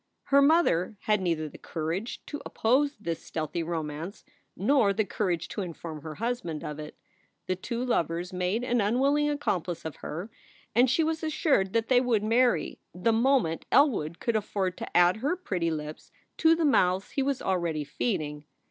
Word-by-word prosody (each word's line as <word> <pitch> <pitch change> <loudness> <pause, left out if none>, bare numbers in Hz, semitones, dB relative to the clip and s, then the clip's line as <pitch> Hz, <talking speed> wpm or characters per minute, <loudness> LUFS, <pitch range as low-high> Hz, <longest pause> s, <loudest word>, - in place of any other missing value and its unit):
Her 280 0 +4
mother 280 - +3
had 210 -2 +1
neither 165 -4 0
the - - -12
courage 170 +7 -4
to 295 - -6
oppose 275 +5 +1
this 170 -5 -4
stealthy 160 +1 -3
romance 165 +3 -5 0.3
nor 215 -1 +3
the 220 +1 0
courage 180 -4 -1
to 210 - -4
inform 165 -3 -6
her 155 0 -7
husband 225 -9 -3
of 150 0 -5
it. 150 - -8 0.5
The 185 - 0
two 235 +6 -4
lovers 175 -6 -1
made 185 +6 -1
an 245 -2 +1
unwilling 275 +8 +2
accomplice 180 - -2
of 160 - -5
her, 180 +8 -6 0.4
and 245 +2 +5
she 320 +6 +3
was 320 0 -1
assured 295 - +1
that 230 -1 +1
they 250 -1 +5
would 235 -5 +1
marry, 225 - +2 0.2
the 200 +6 +1
moment 230 -8 +2
Elwood 200 - +3
could 235 - -1
afford 200 -3 -1
to - - -2
add 175 +3 +5
her 285 +10 0
pretty 185 - -2
lips 155 -1 -6 0.3
to 325 0 +5
the 330 -1 +1
mouths 185 -8 +2
he 275 - -1
was 270 -1 0
already 170 -5 -1
feeding. 150 - -3
200 Hz, 175 wpm, -28 LUFS, 170-250 Hz, 0.5 s, and